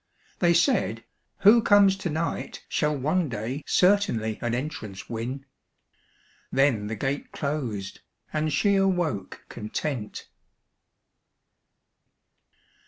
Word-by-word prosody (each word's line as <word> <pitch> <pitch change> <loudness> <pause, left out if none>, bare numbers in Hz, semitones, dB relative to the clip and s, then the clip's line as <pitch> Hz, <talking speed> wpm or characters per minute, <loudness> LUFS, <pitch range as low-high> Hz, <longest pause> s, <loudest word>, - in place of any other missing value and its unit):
They 170 -1 +4
said, 255 - +2 0.4
"Who 220 +4 +7
comes 205 -3 +5
to 190 -2 -3
night 160 +2 -3
Shall 150 -1 0
one 155 +4 0
day 120 +5 -4
certainly 180 - +2
an 120 -1 -1
entrance 125 -8 -5
win;" 125 +4 -5 1.1
Then 130 -6 +2
the 110 - -3
gate 140 +3 -3
closed 120 -10 -4 0.3
and 155 0 0
she 200 +5 +3
awoke 180 - -1
content. 110 0 -5
145 Hz, 100 wpm, -26 LUFS, 115-175 Hz, 1.1 s, Who